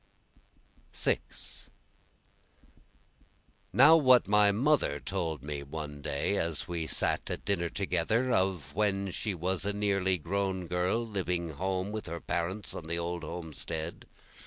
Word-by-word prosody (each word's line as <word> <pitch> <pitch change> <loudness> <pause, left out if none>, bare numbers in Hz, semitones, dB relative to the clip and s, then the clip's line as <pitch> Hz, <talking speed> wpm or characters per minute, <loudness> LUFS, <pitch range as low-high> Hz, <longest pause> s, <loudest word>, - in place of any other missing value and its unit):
6 - - -2 2.0
Now 135 - +8
what 130 - +6
my 105 0 +5
mother 120 - +2
told 80 -1 -3
me 75 -1 -4
one 75 0 -6
day 70 +9 0
as 85 -1 -1
we 85 -3 -2
sat - - +1
at - - -4
dinner 85 -4 0
together, 110 +7 0
Of 95 - 0
when 100 -1 0
she 105 +2 -2
was 90 +1 0
a 100 +1 -1
nearly 100 -2 +1
grown 95 +2 -2
girl 90 +7 0
living 90 -5 -2
home 95 +5 -2
with 110 -3 -5
her 85 0 -4
parents 95 +6 -2
on 80 - -7
the 85 +1 0
old 85 0 -3
homestead. 80 0 -5
90 Hz, 135 wpm, -30 LUFS, 85-100 Hz, 2.0 s, Now